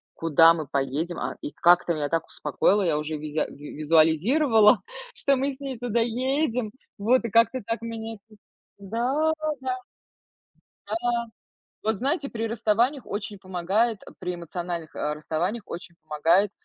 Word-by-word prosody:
куда 165 Hz, +1 st, +6 dB
мы 155 Hz, -3 st, -5 dB
поедем, 140 Hz, +6 st, -2 dB
а, -, -, -4 dB
и -, -, -5 dB
как-то 175 Hz, +1 st, +4 dB
меня 150 Hz, -2 st, -2 dB
так 165 Hz, -1 st, 0 dB
успокоило, 190 Hz, +7 st, +1 dB
я 165 Hz, -5 st, +1 dB
уже 155 Hz, +1 st, -3 dB
визя 150 Hz, +1 st, -2 dB
э, -, -, -10 dB
в -, -, -12 dB
визуализировала, 165 Hz, -, +4 dB, 0.3 s
что 280 Hz, -13 st, +2 dB
мы 275 Hz, +2 st, 0 dB
с 260 Hz, -, -15 dB
ней 270 Hz, -3 st, -4 dB
туда 240 Hz, -1 st, 0 dB
едем, 250 Hz, 0 st, 0 dB, 0.3 s
вот, 235 Hz, +6 st, +3 dB
и 230 Hz, -, -2 dB
как-то 230 Hz, +4 st, +3 dB
так 230 Hz, 0 st, -2 dB
меня 225 Hz, -1 st, -5 dB
тут. 215 Hz, -1 st, -20 dB, 0.4 s
Да, 245 Hz, +10 st, 0 dB, 0.3 s
да. 260 Hz, -1 st, -2 dB, 1.1 s
Да. 240 Hz, -6 st, 0 dB, 0.6 s
Вот, 220 Hz, 0 st, +1 dB
знаете, 275 Hz, +5 st, 0 dB
при 225 Hz, 0 st, -3 dB
расставаниях 230 Hz, +4 st, +1 dB
очень 205 Hz, 0 st, -5 dB
помогает, 190 Hz, +5 st, 0 dB
э, -, -, -11 dB
при 180 Hz, -, -3 dB
эмоциональных, 170 Hz, -1 st, -5 dB
э, 150 Hz, -, -1 dB
расставаниях 170 Hz, +8 st, -2 dB
очень 170 Hz, 0 st, -8 dB
помогает 165 Hz, +6 st, +2 dB
205 Hz, 155 wpm, -26 LUFS, 165-235 Hz, 1.1 s, куда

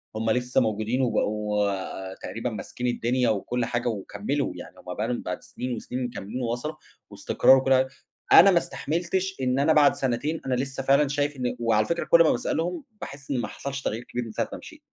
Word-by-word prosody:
هُم 110 Hz, +1 st, 0 dB
لسه 125 Hz, +3 st, +1 dB
موجودين 110 Hz, +2 st, 0 dB
وبقوا 105 Hz, -4 st, -1 dB
تقريبًا 115 Hz, +5 st, -5 dB
ماسكين 120 Hz, +2 st, -5 dB
الدنيا 120 Hz, 0 st, +1 dB
وكُلّ 115 Hz, +3 st, -1 dB
حاجة 120 Hz, 0 st, -2 dB
وكملوا، 105 Hz, +6 st, -2 dB
يعني -, -, -10 dB
هُم -, -, -7 dB
بقى -, -, -2 dB
لهم -, -, -2 dB
بعد -, -, -4 dB
سنين 125 Hz, -1 st, -5 dB
وسنين 125 Hz, +3 st, -4 dB
مكملين 120 Hz, 0 st, -5 dB
ووصلوا، 120 Hz, +6 st, -3 dB, 0.3 s
واستقرار 130 Hz, -, +4 dB
وكُلّ 135 Hz, 0 st, +1 dB
حاجة، 130 Hz, 0 st, +4 dB, 0.5 s
أنا 195 Hz, -, +9 dB
ما 180 Hz, -, +4 dB
استحملتش 175 Hz, +4 st, -1 dB
إن 130 Hz, +1 st, +1 dB
أنا 145 Hz, +3 st, +4 dB
بعد 150 Hz, -2 st, +5 dB
سنتين 135 Hz, +5 st, -1 dB
أنا 130 Hz, -1 st, +1 dB
لسه 135 Hz, +1 st, -3 dB
فعلًا 140 Hz, +2 st, +4 dB
شايف 145 Hz, +1 st, -1 dB
إن 125 Hz, -1 st, -2 dB
وعلى 110 Hz, -2 st, +2 dB
فكرة 170 Hz, 0 st, -1 dB
كُلّ 170 Hz, 0 st, +6 dB
ما 160 Hz, -, +4 dB
باسألهم، 175 Hz, -, -1 dB, 0.2 s
باحِسّ 140 Hz, 0 st, -8 dB
إن 135 Hz, -, +1 dB
ما -, -, -3 dB
حصلش 140 Hz, 0 st, -5 dB
تغيير 115 Hz, -2 st, -3 dB
كبير 125 Hz, 0 st, -4 dB
من 115 Hz, -, -7 dB
ساعة -, -, -2 dB
ما -, -, -4 dB
مشيت، -, -, -13 dB
125 Hz, 195 wpm, -26 LUFS, 115-140 Hz, 0.5 s, أنا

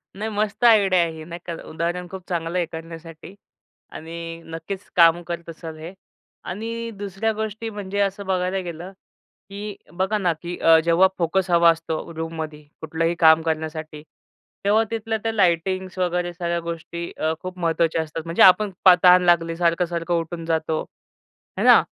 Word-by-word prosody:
नाही 215 Hz, +3 st, -3 dB
मस्त 210 Hz, +1 st, -2 dB
आयडिया 205 Hz, -6 st, +5 dB
आहे 170 Hz, -1 st, 0 dB
ही. 160 Hz, -1 st, -9 dB
नाही 170 Hz, +1 st, -8 dB
का? 170 Hz, -, -4 dB, 0.2 s
उदाहरण 170 Hz, +2 st, -3 dB
खूप 190 Hz, -1 st, -7 dB
चांगलं 170 Hz, 0 st, -2 dB
आहे 175 Hz, -, +1 dB
करण्यासाठी 165 Hz, +1 st, -9 dB, 0.6 s
आणि 165 Hz, +1 st, -7 dB
नक्कीच 165 Hz, +4 st, -7 dB
काम 170 Hz, 0 st, +6 dB
करत 170 Hz, -1 st, -5 dB
असाल 165 Hz, -1 st, -8 dB
हे. 160 Hz, +4 st, -8 dB, 0.5 s
आणि 230 Hz, +4 st, -5 dB
दुसऱ्या 205 Hz, +2 st, -2 dB
गोष्टी 220 Hz, +1 st, -4 dB
म्हणजे 200 Hz, -2 st, -5 dB
असं 200 Hz, 0 st, -1 dB
बघायला 185 Hz, 0 st, 0 dB
गेलं, 175 Hz, 0 st, -7 dB, 0.6 s
की 205 Hz, +1 st, -6 dB, 0.2 s
बघा 190 Hz, +4 st, 0 dB
ना 180 Hz, -4 st, +1 dB
की 175 Hz, 0 st, -5 dB
अ, 165 Hz, 0 st, +6 dB
जेव्हा 170 Hz, +3 st, +5 dB
फोकस 180 Hz, +2 st, 0 dB
हवा 170 Hz, 0 st, +6 dB
असतो 165 Hz, 0 st, -2 dB
रूममध्ये, 160 Hz, -2 st, -5 dB, 0.2 s
कुठलंही 165 Hz, +2 st, -1 dB
काम 160 Hz, -2 st, +7 dB
करण्यासाठी. 155 Hz, -1 st, -4 dB, 0.6 s
तेव्हा 215 Hz, +2 st, +4 dB
तिथल्या 225 Hz, 0 st, -2 dB
त्या 225 Hz, -, 0 dB
लाईटिंग्स 185 Hz, -1 st, 0 dB
वगैरे 175 Hz, -1 st, -1 dB
सगळ्या 170 Hz, 0 st, -2 dB
गोष्टी 170 Hz, +1 st, -6 dB
अ, 155 Hz, +1 st, 0 dB
खूप 185 Hz, 0 st, -7 dB
महत्त्वाच्या 165 Hz, -1 st, +1 dB
असतात 160 Hz, +1 st, -6 dB
म्हणजे 165 Hz, +1 st, -1 dB
आपण 200 Hz, +2 st, +6 dB, 0.3 s
तहान 180 Hz, 0 st, +8 dB
लागली, 165 Hz, -1 st, +3 dB
सारखं-सारखं 170 Hz, 0 st, 0 dB
उठून 165 Hz, 0 st, -6 dB
जातो. 160 Hz, -1 st, -1 dB, 0.8 s
आहे -, -, 0 dB
ना? -, -, +9 dB
170 Hz, 160 wpm, -23 LUFS, 165-190 Hz, 0.8 s, ना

